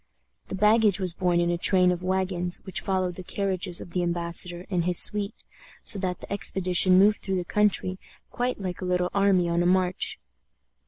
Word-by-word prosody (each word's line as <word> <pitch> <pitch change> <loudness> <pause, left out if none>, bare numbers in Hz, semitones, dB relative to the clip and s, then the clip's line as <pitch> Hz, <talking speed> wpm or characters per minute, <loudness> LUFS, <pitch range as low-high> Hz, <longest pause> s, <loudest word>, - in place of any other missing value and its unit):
The - - -5
baggage 210 0 +3
was 185 -3 +1
borne 175 -1 0
in 175 0 0
a 170 - -2
train 180 0 +3
of 175 0 -4
wagons 185 -1 0
which 190 - -4
followed 185 -2 -2
the 185 - -10
carriages 185 -2 -1
of 175 - -11
the 180 - -2
embassador 175 +1 -4
and 175 -2 0
his 180 -1 +4
suite, 205 -1 +2 0.4
so 210 - +4
that 185 -2 -4
the - - -7
expedition 185 -2 +2
moved 205 +2 +4
through 190 -1 -3
the 180 - -4
country 190 -2 0 0.3
quite 245 -1 -3
like 185 -2 -6
a - - -4
little 180 0 -1
army 195 -3 +2
on 170 0 0
a 175 - +1
march. 185 +1 0
185 Hz, 195 wpm, -25 LUFS, 175-195 Hz, 0.4 s, his